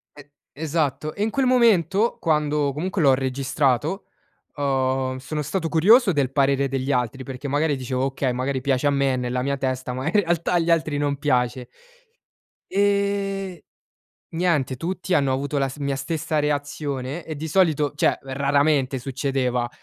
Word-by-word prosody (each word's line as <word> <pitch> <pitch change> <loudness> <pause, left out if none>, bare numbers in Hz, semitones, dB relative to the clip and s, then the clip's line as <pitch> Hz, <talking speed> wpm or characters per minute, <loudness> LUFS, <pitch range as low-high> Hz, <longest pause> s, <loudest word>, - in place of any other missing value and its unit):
E 145 0 -15 0.2
esatto. 155 -1 -2
E 205 - -2
in 220 - +1
quel 265 +4 0
momento, 225 - +3
quando 150 -3 +1
comunque 180 +4 -2
l'ho 135 -3 +5
registrato, 135 - 0 0.5
uhm, 130 -2 0
sono 150 +3 -4
stato 165 +3 -2
curioso 205 +7 +5
del 140 -4 0
parere 140 0 +2
degli 135 +1 -2
altri, 125 +1 -1
perché 135 +2 -7
magari 145 +2 +1
dicevo: 130 0 -2
"Okay, 135 -1 -1
magari 130 +1 -2
piace 135 +1 +1
a - - +4
me 140 -1 +1
è - - -1
nella 125 0 -2
mia 140 +1 -1
testa, 130 -1 -2
ma 130 +2 -4
in 160 - 0
realtà 170 -4 +1
agli 170 -1 +1
altri 155 -3 +1
non 145 -1 0
piace". 125 -3 0 1.0
E 200 -2 0 0.7
niente, 165 -6 0
tutti 180 +5 -3
hanno 140 -5 +3
avuto 140 +2 -2
la 135 -1 +1
st 135 - -10
la - - -4
mia 140 -1 0
stessa 155 +2 -2
reazione 145 0 -3
e 155 -2 -6
di 160 +2 -5
solito 155 -4 +2
cioè, - - +2
raramente 140 0 +1
succedeva. 125 -2 -1
145 Hz, 165 wpm, -23 LUFS, 130-165 Hz, 1.0 s, l'ho